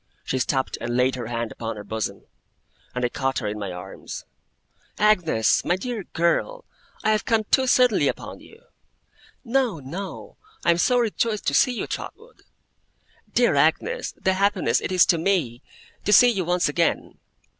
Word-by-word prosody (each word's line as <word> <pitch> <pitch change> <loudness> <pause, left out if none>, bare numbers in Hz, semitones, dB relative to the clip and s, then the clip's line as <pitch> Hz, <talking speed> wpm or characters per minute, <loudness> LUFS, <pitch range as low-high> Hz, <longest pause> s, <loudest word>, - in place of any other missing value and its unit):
She 130 - -2
stopped 130 +1 -1
and 120 +1 -2
laid 130 +1 +3
her 120 -3 -5
hand 115 -1 -3
upon 115 -1 -5
her 105 - -8
bosom, 105 -1 -4 0.7
and 125 0 0
I - - 0
caught 135 +1 -2
her 115 - -3
in 105 +1 -4
my 100 -3 -4
arms. 90 0 -8 0.7
'Agnes! 180 - +3
my 175 - +1
dear 215 0 -5
girl! 335 - -1 0.4
I 215 - +3
have 215 -1 +1
come 225 -2 +1
too 265 -1 +4
suddenly 250 -3 +4
upon - - -4
you.' 450 +2 -17 0.8
'No, 245 - 0
no! 170 +9 -8 0.3
I - - +5
am 170 - +1
so 250 +7 +3
rejoiced 225 -2 0
to - - -5
see 255 - +4
you, 240 - -3
Trotwood!' 465 +2 -8 0.9
'Dear - - +3
Agnes, 485 +2 +1
the 190 - +1
happiness 190 - +1
it - - -4
is 185 -2 +5
to 170 - +2
me, 160 -10 0 0.4
to 210 - 0
see 245 +4 +8
you 190 -6 -2
once 180 +1 +1
again! 165 +3 -1
175 Hz, 170 wpm, -24 LUFS, -, 0.9 s, see